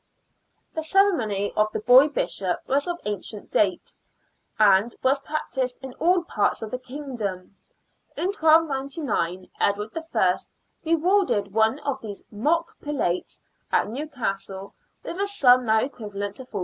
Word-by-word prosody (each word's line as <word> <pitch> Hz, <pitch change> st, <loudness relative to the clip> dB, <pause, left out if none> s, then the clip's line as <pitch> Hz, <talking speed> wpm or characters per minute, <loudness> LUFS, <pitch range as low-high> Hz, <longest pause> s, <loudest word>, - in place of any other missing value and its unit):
The 320 Hz, -, -2 dB
ceremony 300 Hz, -, +2 dB
of 215 Hz, 0 st, +2 dB
the -, -, -3 dB
boy 250 Hz, +6 st, +7 dB
bishop 195 Hz, -10 st, -2 dB
was 280 Hz, +3 st, +1 dB
of 345 Hz, 0 st, -3 dB
ancient 205 Hz, 0 st, -5 dB
date, 190 Hz, -4 st, +1 dB, 0.6 s
and 210 Hz, +2 st, +4 dB
was 270 Hz, +2 st, +3 dB
practised 265 Hz, -4 st, -3 dB
in 265 Hz, -1 st, -7 dB
all 355 Hz, +1 st, +3 dB
parts 210 Hz, -8 st, 0 dB
of 215 Hz, -, -6 dB
the 255 Hz, -, -3 dB
kingdom. 245 Hz, -9 st, -6 dB, 0.6 s
In 365 Hz, -, 0 dB
1299 280 Hz, -, +1 dB
Edward 210 Hz, +2 st, 0 dB, 0.2 s
I. 185 Hz, -4 st, +3 dB, 0.5 s
rewarded 330 Hz, -, +2 dB
one 220 Hz, +4 st, +3 dB
of 275 Hz, -2 st, -3 dB
these 205 Hz, -3 st, -7 dB
mock 310 Hz, +11 st, -1 dB
prelates 260 Hz, -12 st, -2 dB, 0.3 s
at -, -, +2 dB
New 280 Hz, +7 st, -4 dB
castle 195 Hz, -7 st, -4 dB, 0.3 s
with 345 Hz, -, -6 dB
a 400 Hz, -, +1 dB
sum 255 Hz, -, +4 dB
now 220 Hz, 0 st, +4 dB
equivalent 205 Hz, -6 st, -5 dB
to 260 Hz, -, -9 dB
£40. -, -, -34 dB
250 Hz, 140 wpm, -25 LUFS, 205-300 Hz, 0.6 s, boy